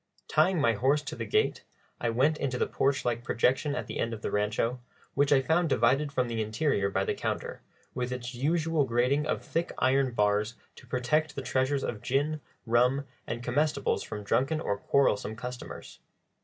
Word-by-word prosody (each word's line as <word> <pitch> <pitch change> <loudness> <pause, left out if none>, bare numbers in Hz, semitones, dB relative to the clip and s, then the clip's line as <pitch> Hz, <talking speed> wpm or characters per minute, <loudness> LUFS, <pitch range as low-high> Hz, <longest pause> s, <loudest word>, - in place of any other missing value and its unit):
Tying 170 +3 +3
my 115 -5 +3
horse 135 +7 +2
to 145 - -5
the - - -5
gate, 430 +1 +1 0.4
I 120 - 0
went 135 +7 +2
into 130 -3 -1
the - - +1
porch 135 0 0
like 120 -1 -1
projection 130 +5 +1
at - - -3
the - - -6
end 115 0 -1
of 105 - -13
the - - -2
rancho, 110 +4 0 0.3
which 140 0 +2
I 135 -2 +5
found 165 +3 +2
divided 135 +4 +2
from 130 -3 0
the 115 -1 -2
interior 110 -1 0
by 95 0 0
the - - 0
counter, - - -4 0.3
with 125 0 -2
its 125 0 -5
usual 155 +4 +1
grating 130 +4 +1
of - - -1
thick 170 +1 -2
iron 130 -1 +2
bars 105 +1 +1 0.2
to - - -14
protect 150 +5 0
the 135 - -4
treasures 135 +1 0
of 110 - -3
gin, 145 +4 0 0.2
rum, 125 +4 +3 0.2
and 120 +1 -4
comestibles 140 +3 +1
from 105 -1 -6
drunken 135 +9 +1
or 100 -10 -1
quarrelsome 110 -2 +1
customers. 125 +2 -8
130 Hz, 185 wpm, -29 LUFS, 115-145 Hz, 0.4 s, I